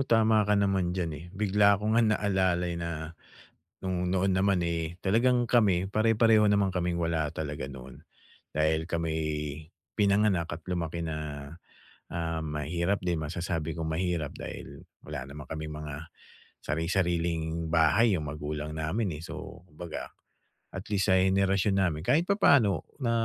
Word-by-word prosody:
tama 110 -2 +4
ka 105 - +4
naman 95 -3 +1
diyan, 85 -3 -1
eh. 75 +3 -8
Bigla 100 +1 +3
ko 105 +2 -1
nga 115 - +5
naalala 95 -5 +1
na 85 -1 -4 0.7
no'ng 90 -1 -1
noon 95 +1 +2
naman, 95 -2 +2
eh, 85 -1 -2
talagang 120 +4 +2
kami 95 -6 +3
pare-pareho 110 +1 +4
naman 100 -1 +3
kaming 90 -2 -1
wala 80 -2 0
talaga 75 -3 -4
noon. 65 -1 -10 0.6
Dahil 80 +1 +1
kami'y 80 -3 -2 0.3
pinanganak 100 -3 +3
at 80 - -7
lumaki 85 -1 -2
na, 75 -3 -5 0.6
ah, 80 -1 -2
mahirap 80 +6 -1
din, 85 -3 0
masasabi 80 0 -3
kong 80 - -2
mahirap 80 -2 -1
dahil - - -8 0.2
wala 65 +2 -6
naman 75 0 -9
kaming 80 -1 -5
mga 75 +2 -7 0.5
sari-sariling 85 0 -1
bahay 85 +8 +4
'yong 75 -5 -2
magulang 75 +1 -5
namin, 90 +7 -1
eh. 80 - -9
So 85 0 -9
kumbaga, 85 0 -8 0.6
at 95 +3 -7
least 100 -2 +1
sa 95 - +5
henerasyon 95 +1 +2
namin, 85 -4 0
kahit 160 +4 +4
papano 140 - +3 0.2
na 115 - +1
85 Hz, 140 wpm, -29 LUFS, 80-100 Hz, 0.7 s, nga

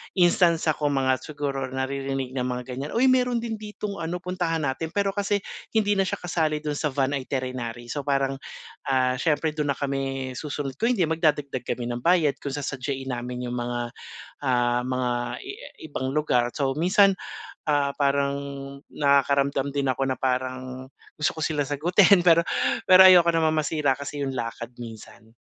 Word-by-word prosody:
instance, 175 -2 +4
ah, - - -1
kung 145 -2 +1
mga 130 -1 +2
siguro 140 -3 -4
naririnig 135 0 -3
na 130 -1 -2
mga 125 0 -3
ganyan, 135 +4 -5
"Uy 255 +3 +5
meron 250 -2 +2
din 225 -2 -4
ditong 210 -2 -6
ano 175 +2 -4
puntahan 175 -3 -1
natin." 140 +4 -2
Pero 200 -1 +1
kasi 200 0 -1 0.3
hindi 210 -2 +3
na 190 - +2
siya - - -1
kasali 160 -3 -1
do'n 150 -1 -2
sa 150 - +1
van 135 -1 0
iterinary. 125 -3 -4
So 145 -1 -4
parang, 135 -1 0 0.5
ah, 130 -1 +2
siyempre 155 +1 +1
dun 150 -1 -2
na - - -18
kami 135 -1 -2
susunod 145 -2 -5
ko 230 - +2
hindi 235 -7 +2
magdadagdag 150 -6 0
kami 120 -1 -2
ng 120 - -3
bayad 165 -1 +2
kung 140 -2 -4
sa 145 - -4
sasadyahin 135 0 -4
namin 125 0 -4
'yung 120 - -4
mga, 120 0 -2 0.6
ah, 120 -2 +2
mga 130 0 -1 0.3
i 395 - -7
ah, - - -12
ibang 130 -2 -3
lugar. 125 -5 +1
So 135 -1 -1
minsan, 190 +4 +4 0.5
ah, 145 -2 +2
parang 140 0 +2 0.5
nakakaramdam 140 0 +1
din 140 -2 +1
ako 135 +1 -1
na 130 - 0
parang 130 0 -3 0.3
gusto 150 - +2
ko - - -4
sila 145 -2 0
sagutin 175 +6 +4
pero 165 -1 +7 0.5
pero 185 0 +8
ayoko 175 -2 +7
namang 160 -1 +2
masira 145 -4 +1
kasi 140 +1 -5
'yung 135 -1 -1
lakad 115 0 -4
minsan. 115 -1 -11
140 Hz, 175 wpm, -25 LUFS, 130-165 Hz, 0.6 s, pero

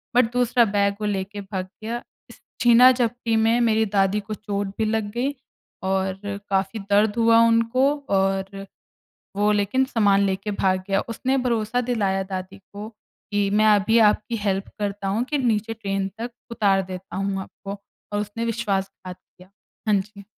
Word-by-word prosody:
But 245 -2 +4
दूसरा 245 -1 +3
bag 200 -1 +1
वो 210 - 0
लेके 200 0 -3
भाग 190 -2 -5 0.2
गया, 235 +2 -3 0.3
इस - - -16 0.2
छीना-झपटी 240 -1 +4
में 225 +2 +3
मेरी 220 -1 +3
दादी 195 0 +1
को 210 +1 -6
चोट 205 -2 -4
भी 220 - +1
लग 215 -1 -1
गई, 250 +5 -1 0.5
और 190 0 -1 0.3
काफ़ी 195 +2 0
दर्द 205 +1 +3
हुआ 230 0 +5
उनको 230 +4 +3 0.2
और 195 0 0 0.7
वो 205 +1 +2
लेकिन 205 +5 +1
सामान 205 -6 +3
लेके 195 +2 -2
भाग 190 -2 +1
गया। 195 0 +2
उसने 260 +4 -1
भरोसा 240 -2 0
दिलाया 195 -5 0
दादी 185 0 -5
को, 205 +2 -10 0.4
कि 205 -1 +1
मैं 210 +2 +3
अभी 210 +3 +3
आपकी 215 +3 -2
हेल्प 195 -1 0
करता 205 -1 -3
हूँ, 210 +5 0
कि 295 +3 -2
नीचे 225 -4 0
ट्रेन 195 -3 -2
तक 240 +1 -4 0.2
उतार 200 -4 +2
देता 185 -1 -8
हूँ 195 0 -1
आपको, 200 +1 -8 0.3
और 205 0 0
उसने 210 +3 -4
विश्वासघात 195 -5 -3
किया। 180 +1 -21 0.4
हाँ 210 - +4
जी। 200 +1 -13
205 Hz, 160 wpm, -23 LUFS, 195-230 Hz, 0.7 s, हुआ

